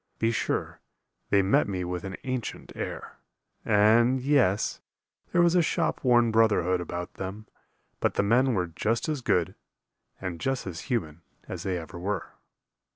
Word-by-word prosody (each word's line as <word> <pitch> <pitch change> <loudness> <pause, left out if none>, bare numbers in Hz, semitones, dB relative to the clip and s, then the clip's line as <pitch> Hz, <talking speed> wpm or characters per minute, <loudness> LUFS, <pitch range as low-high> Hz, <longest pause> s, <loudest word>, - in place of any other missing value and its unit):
Be 115 +1 +1
sure, 115 - -2 0.5
they 100 -1 +4
met 95 - +3
me 95 -2 -2
with 90 0 -4
an 95 0 -5
ancient 130 -3 -4
air, - - -6 0.4
And 115 +4 +4
yes, 125 -7 +2 0.5
there 175 -1 +4
was 170 0 +4
a 180 - +5
shop 160 - 0
worn 120 -3 +4
brotherhood 105 -5 +3
About 90 0 -5
them; 100 +3 -6 0.5
but - - 0
the - - +2
men 125 +4 +3
were 90 -2 +1
just 110 - -1
as 150 -4 -2
good, 90 -8 +1 0.7
And 90 -3 -5
just 135 -1 -1
as 90 -3 -5
human 85 - -2 0.3
as - - -5
they 95 -2 -1
ever 85 +1 -8
were. 100 +1 -3
105 Hz, 155 wpm, -27 LUFS, 90-125 Hz, 0.7 s, a